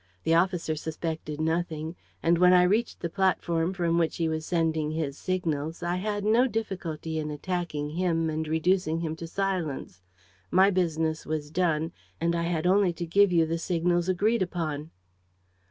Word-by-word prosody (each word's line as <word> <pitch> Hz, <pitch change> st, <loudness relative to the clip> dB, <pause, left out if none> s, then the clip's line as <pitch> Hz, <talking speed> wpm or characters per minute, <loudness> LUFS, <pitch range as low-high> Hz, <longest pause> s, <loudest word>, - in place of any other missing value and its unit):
The 165 Hz, -, +2 dB
officer 170 Hz, -2 st, +2 dB
suspected 155 Hz, -1 st, -4 dB
nothing; 160 Hz, 0 st, -1 dB, 0.3 s
and, 170 Hz, 0 st, +3 dB
when 180 Hz, 0 st, +6 dB
I 180 Hz, 0 st, +7 dB
reached 210 Hz, +6 st, +1 dB
the 170 Hz, -, -1 dB
platform 175 Hz, -2 st, +1 dB
from 170 Hz, -3 st, +1 dB
which 165 Hz, -1 st, 0 dB
he 165 Hz, -, +1 dB
was 160 Hz, 0 st, -3 dB
sending 160 Hz, -3 st, +1 dB
his 155 Hz, -3 st, -2 dB
signals, 165 Hz, -3 st, -2 dB
I 175 Hz, +1 st, 0 dB
had 205 Hz, +1 st, -2 dB
no 230 Hz, +4 st, +4 dB
difficulty 170 Hz, -8 st, -3 dB
in 150 Hz, -1 st, -3 dB
attacking 150 Hz, -1 st, -3 dB
him 165 Hz, -1 st, 0 dB
and 155 Hz, 0 st, -2 dB
reducing 160 Hz, +1 st, +1 dB
him 160 Hz, -1 st, -2 dB
to 165 Hz, -, -6 dB
silence. 170 Hz, -, -3 dB, 0.5 s
My 190 Hz, +2 st, +5 dB
business 160 Hz, -4 st, 0 dB
was 150 Hz, -1 st, -3 dB
done 165 Hz, -2 st, +1 dB, 0.3 s
and 170 Hz, +1 st, +1 dB
I 170 Hz, 0 st, 0 dB
had 165 Hz, -1 st, -1 dB
only 190 Hz, -1 st, +4 dB
to 170 Hz, +1 st, -4 dB
give 200 Hz, +3 st, +4 dB
you 165 Hz, -2 st, +4 dB
the 165 Hz, +1 st, -2 dB
signals 175 Hz, +1 st, 0 dB
agreed 210 Hz, +5 st, +2 dB
upon." 160 Hz, -4 st, -2 dB
170 Hz, 170 wpm, -27 LUFS, 160-180 Hz, 0.5 s, I